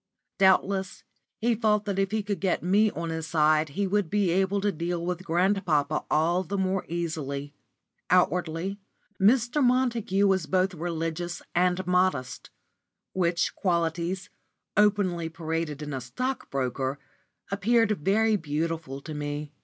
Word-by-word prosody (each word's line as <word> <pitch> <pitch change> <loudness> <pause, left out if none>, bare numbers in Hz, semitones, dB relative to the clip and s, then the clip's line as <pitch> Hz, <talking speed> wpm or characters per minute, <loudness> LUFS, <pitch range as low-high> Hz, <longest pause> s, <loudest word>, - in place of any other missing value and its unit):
Doubtless 190 0 +2 0.3
he 235 +1 +1
felt 210 -2 +1
that 200 -2 -1
if 195 -1 +1
he 215 0 -1
could 205 -1 -3
get 190 -4 0
me 205 +4 +4
on 170 -4 -4
his 160 0 -4
side 155 -1 +3
he 200 - +2
would 195 -2 0
be 200 -2 +1
able 190 +2 +1
to 205 +1 +1
deal 170 0 -3
with 180 0 -3
grandpapa 175 -4 +1
all 165 +4 +2
the 195 +2 -4
more 190 0 0
easily. 145 -4 -3 0.6
Outwardly 180 +1 +1 0.4
Mr. 240 +6 +3
Montague 240 -6 +2
was 190 -5 +2
both 185 0 +1
religious 170 +1 -3
and 180 +1 +1
modest; 180 -7 0 0.6
which 175 -1 +1
qualities, 175 +1 -1 0.4
openly 195 -5 +2
paraded 160 -2 -3
in 150 -1 -5
a 130 - -3
stockbroker, 135 - -3 0.5
appeared 225 +3 +2
very 220 +4 +3
beautiful 160 -3 -3
to 155 - -7
me. 145 0 -4
180 Hz, 135 wpm, -27 LUFS, 160-200 Hz, 0.6 s, me